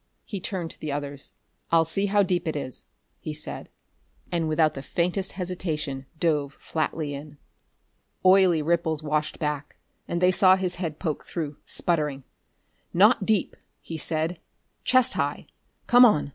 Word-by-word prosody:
He 200 - -5
turned 180 -3 -4
to - - -12
the 155 - -4
others. 140 -1 -5 0.4
"I'll 165 -1 +5
see 195 +5 0
how 205 +1 +4
deep 180 -2 0
it 160 - -1
is," 135 -3 -3 0.3
he 155 - -5
said, 150 - -6 0.6
and 165 -2 0
without 155 0 +3
the 135 - -6
faintest 180 +6 -1
hesitation 155 -7 -3
dove 150 -4 +1
flatly 155 -1 -3
in. 145 +1 -8 0.9
Oily 185 -4 +6
ripples 160 -1 0
washed 155 0 -1
back, 150 -1 -3 0.3
and 170 - -1
they 180 +1 +5
saw 185 0 +6
his 185 -2 -1
head 160 -4 -3
poke 160 -4 -3
through, 150 -4 -4
sputtering. 150 -5 0 0.7
"Not 205 +2 +5
deep," 215 -4 +1 0.2
he 165 -1 -7
said. 160 +3 -1 0.4
"Chest 255 -2 +4
high. - - -2 0.4
Come 245 +1 +7
on." 155 -11 +3
165 Hz, 150 wpm, -26 LUFS, 150-185 Hz, 0.9 s, Come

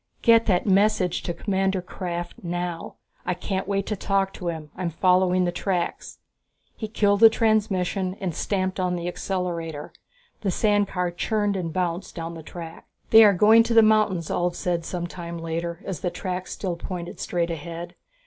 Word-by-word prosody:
"Get 230 -1 +5
that 180 -4 +2
message 200 -2 +2
to - - -3
Commander 190 0 0
Krafft 175 -1 -5
now. 175 -1 -4 0.3
I 180 - -1
can't 190 +1 -3
wait 200 -1 0
to 210 - -2
talk 195 0 0
to 180 - -6
him 160 -3 -4
I'm 180 -1 -2
following 180 +2 +3
the 175 - 0
tracks." 175 -1 -3 0.6
He 220 - -5
killed 205 -2 +2
the 225 0 +9
transmission 200 -4 +1
and 185 -4 -2
stamped 185 +2 -1
on 180 -1 0
the 175 0 -4
accelerator. 170 -5 -4 0.5
The 200 - 0
sand 205 +2 +2
car 180 -2 -2
churned 205 +3 0
and 175 -4 -3
bounced 175 +1 -2
down 165 -1 -5
the 165 - -8
track. 165 +1 -9 0.2
"They 225 0 +10
are 205 -2 +7
going 215 +5 +6
to 230 0 0
the 225 - +8
mountains," 210 -6 +2
Ulv 175 0 0
said 170 -2 -2
some 175 0 -3
time 170 -1 -7
later, 165 +1 -4
as 185 -6 -4
the 180 - -1
tracks 185 0 -5
still 180 -4 -3
pointed 175 0 -6
straight 170 -1 -1
ahead. 170 +2 -6
180 Hz, 175 wpm, -24 LUFS, 170-200 Hz, 0.6 s, They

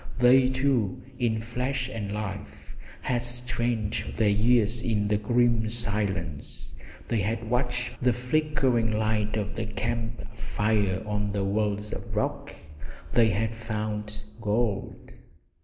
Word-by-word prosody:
They, 125 +1 +6
too, 130 -6 +1 0.2
in 110 -3 +1
flesh 125 +3 -2
and 110 -6 -4
life, 105 -2 -5 0.3
had 120 -2 +1
strained 120 -3 -1
their 110 -2 +3
ears 115 +2 +3
in 110 -4 +1
the 105 - +3
grim 115 +1 +2
silence, 100 -9 -2 0.3
they 115 - +1
had 110 +3 -1
watched 125 -1 -1
the 125 0 +4
flickering 125 -2 +1
light 110 0 +1
of 105 -1 -2
their 110 -1 -3
camp 110 +1 -3
fire 105 -4 0
on 105 -1 -1
the 100 -1 -1
walls 105 +1 0
of - - -6
rock - - -1
and 75 -2 -13 0.2
they 115 -2 +5
had 110 +2 0
found 105 -1 -3 0.2
gold! 105 -1 -1
110 Hz, 130 wpm, -27 LUFS, 105-120 Hz, 0.3 s, They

